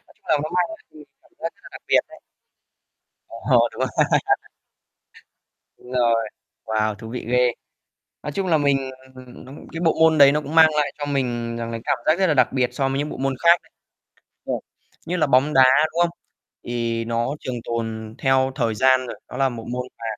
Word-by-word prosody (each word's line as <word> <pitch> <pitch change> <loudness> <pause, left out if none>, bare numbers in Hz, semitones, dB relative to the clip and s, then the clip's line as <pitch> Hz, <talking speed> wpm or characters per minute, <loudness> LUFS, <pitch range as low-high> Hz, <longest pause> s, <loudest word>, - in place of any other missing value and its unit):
chung - - -38
là 155 - +3
nó 155 - -4
mang 180 - +3
lại 220 - -8
cho - - -17
mình 150 - -12 0.2
cảm - - -28
giác - - -4
rất - - -31
là - - -12
đặc - - -10
biệt - - +5
đấy. - - -15 1.1
Ồ. 120 0 +2
Đúng - - -12
rồi 130 - +1 1.9
Đúng 125 - -15
rồi, 115 -3 +1 0.4
wow, 110 -1 0
thú 110 +1 -10
vị 125 - -6
ghê. 125 0 +3 0.7
Nói 150 - -4
chung 190 +4 -2
là 165 -3 +3
mình, 140 -2 +2 0.4
ừm, 125 -1 -13
nó 130 - -12 0.2
cái 165 - -5
bộ 165 -2 +1
môn 160 -1 +5
đấy 140 -1 +8
nó 150 +1 0
cũng 150 +2 -7
mang 160 -1 +8
lại 145 -2 +1
cho 145 - -4
mình 120 -4 -2
rằng 115 0 -4
là 115 - -3
cảm - - +1
giác 155 +4 +3
rất 190 - +3
là 155 - +3
đặc 130 - +2
biệt 125 -2 +1
so 135 -2 0
mới 135 0 -1
những 150 +1 -2
bộ - - -7
môn 135 0 -1
khác 170 0 +6
đấy. - - -27 0.8
Và - - -2 0.5
như 180 +2 -1
là 155 - +2
bóng 140 +2 +3
đá, 130 - +7 0.3
đúng 170 - -1
không? 175 - +2 0.5
Thì 115 -1 -2
nó 115 +4 -1
trường 130 -2 -4
tồn 110 -1 -4
theo 130 0 +2
thời 115 -5 -1
gian 130 +2 +3
rồi. - - -8
Nó - - -8
là 135 -1 +2
một 115 -3 -7
môn 125 0 -3
mà - - -9
130 Hz, 220 wpm, -22 LUFS, 115-150 Hz, 1.9 s, đấy